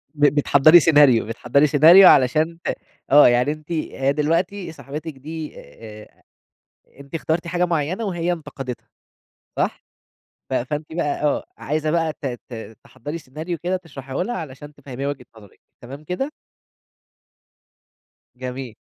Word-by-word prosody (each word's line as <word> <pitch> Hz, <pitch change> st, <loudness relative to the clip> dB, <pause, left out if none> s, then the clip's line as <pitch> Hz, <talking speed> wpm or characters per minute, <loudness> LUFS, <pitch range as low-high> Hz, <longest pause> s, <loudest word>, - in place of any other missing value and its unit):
ب 145 Hz, 0 st, +3 dB
بتحضّري 145 Hz, +3 st, +6 dB
سيناريو 145 Hz, -7 st, +5 dB
بتحضّري 125 Hz, +6 st, +1 dB
سيناريو 165 Hz, +6 st, +8 dB
علشان 155 Hz, +5 st, +4 dB, 0.5 s
آه 145 Hz, -1 st, +8 dB
يعني 125 Hz, +4 st, +2 dB
أنتِ 155 Hz, +2 st, -9 dB
هي 140 Hz, -4 st, -1 dB
دلوقتي 170 Hz, +4 st, -1 dB
صاحبتِك 150 Hz, +1 st, -8 dB
دي 155 Hz, +3 st, -7 dB
آآ 105 Hz, -1 st, -14 dB, 0.8 s
أنتِ 140 Hz, +3 st, -10 dB
إخترتِ 165 Hz, +2 st, -2 dB
حاجة 180 Hz, 0 st, 0 dB
معيّنة 170 Hz, +6 st, -2 dB
وهي 175 Hz, -2 st, -1 dB
انتقدتها، 135 Hz, -6 st, -8 dB, 0.7 s
صح؟ -, -, -2 dB, 0.7 s
ف -, -, -4 dB
فأنتِ 150 Hz, +5 st, -3 dB
بقى 150 Hz, -3 st, -2 dB
آه، 145 Hz, -, +1 dB
عايزة 155 Hz, +2 st, -2 dB
بقى 165 Hz, -2 st, 0 dB
ت -, -, -6 dB, 0.2 s
ت 110 Hz, -2 st, -9 dB
تحضّري 145 Hz, +7 st, -8 dB
سيناريو 155 Hz, +4 st, -6 dB
كده 180 Hz, +4 st, -2 dB
تشرحيه 135 Hz, -6 st, -10 dB
لها 240 Hz, +3 st, -4 dB
علشان 145 Hz, -1 st, -9 dB
تفهميها 140 Hz, -1 st, -7 dB
وجهة 130 Hz, -4 st, -6 dB
نظرِك، 105 Hz, -3 st, -17 dB, 0.2 s
تمام 140 Hz, +5 st, -10 dB
كده؟ 265 Hz, -, -3 dB, 2.0 s
جميل. 125 Hz, -2 st, -7 dB
150 Hz, 130 wpm, -21 LUFS, 135-165 Hz, 2.0 s, سيناريو